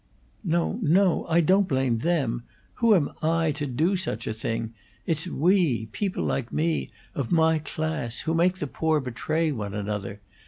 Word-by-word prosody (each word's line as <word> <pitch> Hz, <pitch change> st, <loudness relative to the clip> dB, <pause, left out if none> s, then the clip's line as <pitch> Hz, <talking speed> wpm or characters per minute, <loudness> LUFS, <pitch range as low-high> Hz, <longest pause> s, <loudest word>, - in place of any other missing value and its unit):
"No, 170 Hz, +4 st, 0 dB
no! 185 Hz, +1 st, +3 dB
I 170 Hz, +1 st, +4 dB
don't 190 Hz, +4 st, +3 dB
blame 130 Hz, -5 st, +1 dB
them. 135 Hz, -6 st, 0 dB, 0.4 s
Who 230 Hz, -2 st, +6 dB
am 160 Hz, -6 st, +1 dB
I, 160 Hz, 0 st, +2 dB
to 145 Hz, 0 st, -3 dB
do 155 Hz, +10 st, +1 dB
such 150 Hz, -, -3 dB
a -, -, -2 dB
thing? 115 Hz, +1 st, -3 dB, 0.3 s
It's 165 Hz, +1 st, -1 dB
we 160 Hz, -, +2 dB
people 195 Hz, -, -2 dB
like 125 Hz, -3 st, -2 dB
me, 160 Hz, +1 st, 0 dB, 0.2 s
of 135 Hz, -5 st, -3 dB
my 160 Hz, -1 st, +4 dB
class 155 Hz, -5 st, -3 dB
who 160 Hz, -, -1 dB
make 175 Hz, +3 st, +2 dB
the 150 Hz, -, -3 dB
poor 155 Hz, +2 st, 0 dB
betray 150 Hz, +5 st, -1 dB
one 105 Hz, -6 st, -4 dB
another. 105 Hz, -1 st, -4 dB
155 Hz, 165 wpm, -26 LUFS, 120-170 Hz, 0.4 s, Who